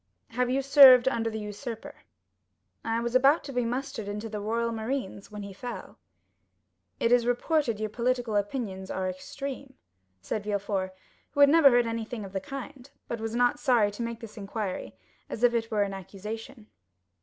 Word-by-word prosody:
"Have 250 +1 0
you 270 +2 +1
served 265 -2 +9
under 230 -3 +1
the 220 - -5
usurper?" 215 +2 -6 0.9
"I 225 0 0
was 235 0 -2
about 275 +5 +5
to 275 - -7
be 245 0 +1
mustered 240 -3 -3
into 210 +2 -4
the 210 -1 -4
Royal 230 +3 -1
Marines 220 -3 -4
when 210 -1 -7
he 200 -1 -8
fell." 245 +5 -8 1.0
"It 230 - +2
is 245 -1 +4
reported 245 -2 +1
your 215 -1 -3
political 245 -1 -1
opinions 205 -2 -2
are 190 0 -2
extreme," 265 +8 -6 0.4
said 205 - -4
Villefort, 200 -2 -2 0.4
who - - -4
had 285 - +8
never 310 -2 +7
heard 245 -1 +4
anything 230 -1 -4
of 190 - -11
the 195 - -2
kind, 275 +1 -8 0.2
but 230 -2 -4
was 225 +1 -3
not 245 +4 +2
sorry 235 -8 +3
to 205 - -7
make 230 -1 -4
this 225 -1 -10
inquiry, 200 -1 -4 0.3
as 230 - -5
if 245 -1 +5
it 225 -1 -1
were 210 -2 +2
an 200 -1 -4
accusation. 215 +6 -8
230 Hz, 180 wpm, -28 LUFS, 210-250 Hz, 1.0 s, served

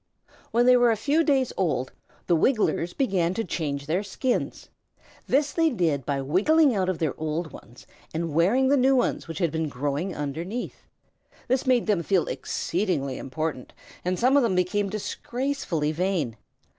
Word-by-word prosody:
When 240 +1 +2
they 250 0 +7
were 245 -1 +5
a 225 - +3
few 290 +9 +2
days 270 -5 +1
old 155 -9 0 0.3
the 175 - +3
Wigglers 175 - +1
began 190 -9 0
to 225 - -1
change 145 -6 -3
their 165 +5 0
skins. 240 +5 -2 0.6
This 290 +2 +2
they 325 -1 +3
did 160 - 0
by 140 -1 0
wiggling 260 - +3
out 185 -2 0
of 185 - -1
their 160 -5 -1
old 160 +1 -3
ones 120 +2 -14 0.3
and 165 -1 -3
wearing 215 - +3
the 285 - +4
new 265 +1 +4
ones 250 - 0
which 165 -2 -6
had 170 -3 0
been 160 -1 -2
growing 145 +7 -2
underneath. 165 - -5 0.6
This 260 +1 0
made 250 -2 +3
them 205 -6 +1
feel 185 +1 +1
exceedingly 165 -8 -2
important, 150 -1 -4 0.3
and 180 +1 -1
some 255 +6 +3
of 285 - +6
them 225 -7 +1
became 195 +3 +1
disgracefully 215 - -2
vain. 165 - -1
185 Hz, 170 wpm, -25 LUFS, 155-245 Hz, 0.6 s, they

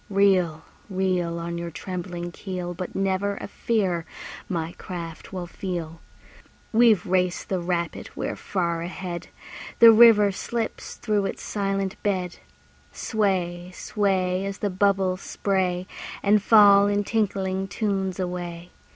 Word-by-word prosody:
Reel, 185 -5 +3 0.3
reel. 185 -3 0
On 170 0 -4
your 170 0 -4
trembling 175 0 -5
keel, 180 -1 -5
But 180 +1 -6
never 195 +1 0
a - - -7
fear 195 -6 0 0.5
my 165 -3 -2
craft 170 -3 -7
will 185 -2 -4
feel. 170 -3 -5 0.7
We've 225 -4 +5
raced 180 -1 0
the 190 - 0
rapid, 170 -1 -2
we're - - -3
far 170 -4 -2
ahead! 175 0 -5 0.5
The 230 -1 +10
river 220 -3 +7
slips 230 +3 -4
through 205 -3 0
its - - -6
silent 195 -2 -2
bed. 185 -3 -1 0.5
Sway, 180 -5 -1
sway, 190 -3 0
As 195 0 -4
the 205 - -2
bubbles 190 -1 +1
spray 185 -2 -1 0.4
And 205 +1 +4
fall 205 -2 +7
in 205 0 +1
tinkling 195 -3 -1
tunes 195 -3 -2
away. 175 -1 -5
190 Hz, 125 wpm, -25 LUFS, 175-200 Hz, 0.7 s, The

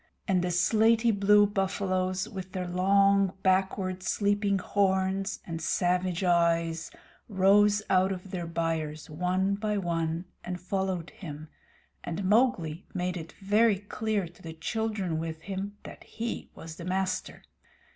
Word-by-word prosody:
The 180 -2 +2
slaty 220 +6 +3
blue 205 0 +5
buffaloes, 190 -1 -1
with 190 -4 -8
their 185 -1 -3
long, 195 +1 +3
backward 190 0 +1
sweeping 200 +1 +1
horns 195 0 0
and 165 -1 -5
savage 180 +2 0
eyes, 170 -2 +2 0.4
rose 205 +1 +4
out 185 +1 +3
their 180 -3 -5
byres, 160 -2 -3
one 180 +4 0
by 210 +1 -1
one, 165 -2 -1 0.2
and 180 0 -5
followed 185 -2 -2
him, 155 -4 -9 0.5
and 175 +3 -4
Mowgli 190 -6 +2
made 180 0 -1
it 165 -2 -7
very 210 +2 +3
clear 205 -1 -2
to 170 - -18
the 165 -1 -7
children 195 -1 -2
with 160 0 -5
him 200 +3 -5
that - - -11
he 230 +1 -5
was 160 0 -9
the 170 - -7
master. 185 0 -2
185 Hz, 130 wpm, -28 LUFS, 175-200 Hz, 0.5 s, blue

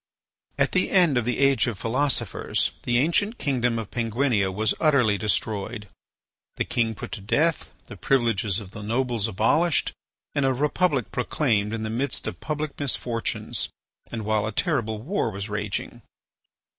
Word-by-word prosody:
At - - +2
the 185 - +1
end 175 -7 +4
of 120 -2 +1
the 125 - 0
age 135 -1 +3
of 115 -4 -2
philosophers, 130 +7 0
the 120 0 +1
ancient 185 - +2
kingdom 125 -4 0
of 110 -3 -5
Penguinia 115 -3 +1
was 105 +3 +1
utterly 135 -9 +4
destroyed, 105 +1 -2 0.7
the - - -1
king 115 -2 0
put - - -7
to - - -5
death, 155 +10 +1
the - - -10
privileges 115 -6 +1
of 100 -3 -10
the 105 - -8
nobles 115 0 0
abolished, 140 - +2 0.4
and 145 - +1
a 135 0 +3
Republic 150 - +1
proclaimed 115 -5 0
in 110 -1 -3
the 110 - -3
midst 130 +3 -1
of - - -4
public 150 -1 -3
misfortunes 120 -4 -1 0.4
and 115 -3 -4
while 110 0 +1
a - - -2
terrible 115 - 0
war 185 - 0
was 100 0 -5
raging. 105 -1 -3
120 Hz, 155 wpm, -25 LUFS, 110-140 Hz, 0.7 s, end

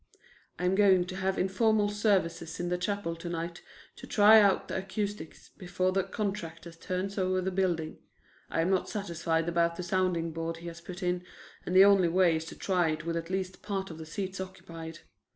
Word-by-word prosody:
"I'm 180 +2 +1
going 190 -3 +5
to 185 - -7
have 190 0 -1
informal 205 +2 +2
services 190 -6 0
in 175 0 -2
the 180 - 0
chapel 185 -3 -2
to 170 +1 -6
night 170 0 -4 0.4
to - - -10
try 215 0 +7
out 200 -2 +3
the - - -3
acoustics 200 -1 -5
before 185 0 0
the 195 +1 +2
contractor 175 -6 -4
turns 185 +4 -4
over 185 0 +1
the 185 +1 -1
building. 175 -4 -1 0.5
I - - 0
am 175 +4 +1
not 190 - +1
satisfied 165 -5 -1
about 170 0 +1
the 180 - -5
sounding 175 -2 0
board 165 +1 -4
he 170 +1 -9
has 170 0 -11
put 180 +2 -8
in, 180 0 0 0.4
and 180 - -1
the 190 +1 +9
only 200 -3 +5
way 175 -1 +3
is 160 - -5
to - - -9
try 180 -4 +1
it 155 0 -3
with 165 0 -2
at 165 0 -4
least 190 0 -3
part 195 -3 -3
of 160 - -9
the 160 - -8
seats 190 +2 -4
occupied. 165 -3 -9
180 Hz, 200 wpm, -29 LUFS, 165-195 Hz, 0.5 s, the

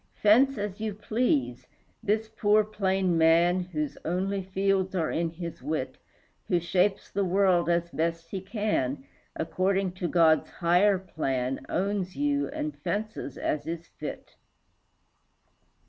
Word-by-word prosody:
Fence 250 +6 +4
as 205 0 -4
you 215 -2 -3
please, 140 - 0 0.3
this 215 +2 0
plain 215 -1 +2
poor 195 -2 0
man, 170 0 +4
Whose 155 -5 -4
only 190 +4 -1
fields 190 0 0
are 165 -4 0
in 165 0 0
his 170 -2 -7
wit, 145 -1 -3 0.5
Who 175 - +2
shapes 185 +3 0
the 200 - 0
world, 185 -2 +3
as 170 0 +1
best 165 +2 -2
he 195 - -3
can, 190 - -1 0.3
According 190 +3 0
to 175 - +1
God's 165 -2 +4
higher 180 +4 +3
plan, 135 -8 -2
Owns 190 0 -1
you 285 0 0
and 300 +1 -4
fences 215 +1 -4
as 150 0 -2
is 165 0 -5
fit. - - -7
185 Hz, 130 wpm, -28 LUFS, 165-205 Hz, 0.5 s, Fence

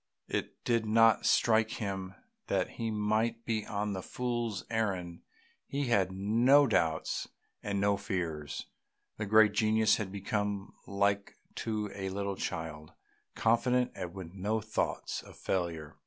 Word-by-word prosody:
It - - -4
did 115 -2 +2
not 115 0 +5
strike 110 -1 +4
him 95 -3 -4 0.3
that 95 -2 +1
he 115 -1 -4
might 110 +2 0
be 110 -2 -1
on 105 -1 -2
a 95 - -3
fool's 120 -2 -3
errand, 95 -7 -2 0.5
he 140 +1 -2
had 95 -5 +3
no 115 +9 +5
doubts 80 -10 0 0.3
and 100 -1 -2
no 100 0 +3
fears; 85 -7 -3 0.5
the 105 - -3
great 110 0 +6
genius 110 +1 +3
had 100 -3 -4
become 100 0 -2
like 100 0 0 0.2
to 105 -2 -2
a 95 -1 -4
little 100 +1 -2
child, 80 -4 -5 0.4
confident 125 +2 +2
and 90 - -5
with 90 -3 -8
no 105 +3 -1
thoughts 110 +1 -2
of - - -15
failure. 85 -5 -2
105 Hz, 140 wpm, -31 LUFS, 95-110 Hz, 0.5 s, great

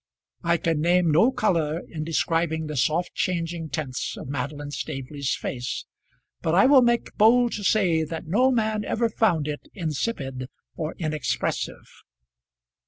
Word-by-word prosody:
I 170 0 +3
can 160 -2 0
name 175 0 +3
no 180 - +5
colour 165 - +1
in 155 -3 -5
describing 165 0 0
the 150 0 -5
soft 155 +7 +1
changing 170 -2 -2
tints 140 -4 -3
of - - -8
Madeline 145 +2 -4
Staveley's 140 0 -3
face, 125 -1 -4 0.6
but 160 +1 +1
I 195 - +6
will 270 0 +7
make 235 -1 +1
bold 235 +3 +5
to 210 - -4
say 180 -6 +3
that 160 +2 -6
no 230 +11 +3
man 220 -4 +1
ever 230 +2 0
found 170 -9 +1
it 150 -1 -5
insipid 145 - -3 0.3
or 155 -1 -4
inexpressive. 155 -3 -2
165 Hz, 145 wpm, -25 LUFS, 150-205 Hz, 0.6 s, will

